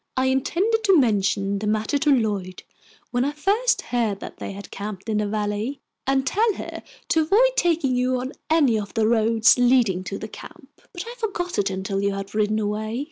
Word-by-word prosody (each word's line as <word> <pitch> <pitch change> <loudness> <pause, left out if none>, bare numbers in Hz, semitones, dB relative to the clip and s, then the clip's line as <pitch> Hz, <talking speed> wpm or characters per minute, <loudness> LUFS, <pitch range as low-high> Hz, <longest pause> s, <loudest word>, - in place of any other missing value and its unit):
I 260 - +2
intended 355 - +1
to 390 -3 +6
mention 200 -5 +1
the 210 - -3
matter 215 +6 0
to 300 - +1
Lloyd 205 -8 0 0.5
when 245 0 +1
I 285 +2 -1
first 410 +11 +1
heard 220 -5 0
that - - -9
they - - -6
had 200 +1 -10
camped 200 -1 -7
in 215 -1 0
the 210 - 0
Valley, 210 +5 -2 0.3
and 270 0 +2
tell 430 - +2
her - - -7 0.3
to 320 - +3
avoid 420 +11 +4
taking 330 - +1
you 250 0 +1
on 260 +3 -5 0.2
any 285 -9 +3
of 205 +2 -7
the 220 -1 +2
roads 225 +1 +4
leading 240 -7 +3
to 195 - -4
the 220 - -6
camp. 270 +6 -12 0.2
But 350 0 -6
I 470 - -7
forgot 360 - -2
it 200 0 +1
until 190 +1 -3
you 200 0 0
had 195 0 -6
ridden 215 0 +1
away. 215 +2 -2
235 Hz, 200 wpm, -23 LUFS, 210-300 Hz, 0.5 s, to